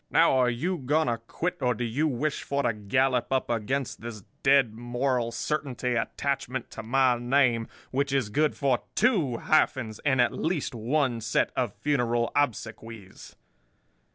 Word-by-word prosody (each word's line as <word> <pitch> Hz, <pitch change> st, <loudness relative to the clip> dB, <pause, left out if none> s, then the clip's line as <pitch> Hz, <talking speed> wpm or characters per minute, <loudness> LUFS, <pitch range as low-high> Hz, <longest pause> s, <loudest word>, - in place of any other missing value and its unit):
Now, 165 Hz, -4 st, +4 dB
are 125 Hz, -1 st, +4 dB
you 170 Hz, +10 st, -1 dB
going 150 Hz, +4 st, +1 dB
to 115 Hz, -4 st, -1 dB
quit, 175 Hz, +10 st, -4 dB
or 125 Hz, -1 st, +1 dB
do 120 Hz, -, -3 dB
you 125 Hz, +7 st, 0 dB
wish 150 Hz, +2 st, -1 dB
for 140 Hz, 0 st, -1 dB
to 115 Hz, -, +1 dB
gallop 125 Hz, +5 st, 0 dB
up 130 Hz, -2 st, 0 dB
against 120 Hz, +4 st, -2 dB
this 110 Hz, -3 st, -7 dB, 0.2 s
Dead 135 Hz, -5 st, +4 dB
Moral 120 Hz, +1 st, -1 dB
Certainty 130 Hz, -3 st, -2 dB
attachment 130 Hz, +1 st, -2 dB
to -, -, -7 dB
my 125 Hz, +1 st, +2 dB
name, 120 Hz, -2 st, +2 dB, 0.2 s
which 140 Hz, +1 st, 0 dB
is 135 Hz, -6 st, +1 dB
good 150 Hz, +7 st, +1 dB
for 135 Hz, -4 st, +2 dB, 0.2 s
two 160 Hz, -, +2 dB
hyphens 120 Hz, -8 st, +1 dB
and 130 Hz, -3 st, +1 dB
at 120 Hz, -, +3 dB
least 160 Hz, -5 st, -2 dB
one 120 Hz, +1 st, 0 dB
set 110 Hz, 0 st, +1 dB
of 120 Hz, -6 st, -1 dB
funeral 120 Hz, -5 st, 0 dB
obsequies? 115 Hz, -6 st, -3 dB
125 Hz, 155 wpm, -27 LUFS, 115-140 Hz, 0.2 s, Now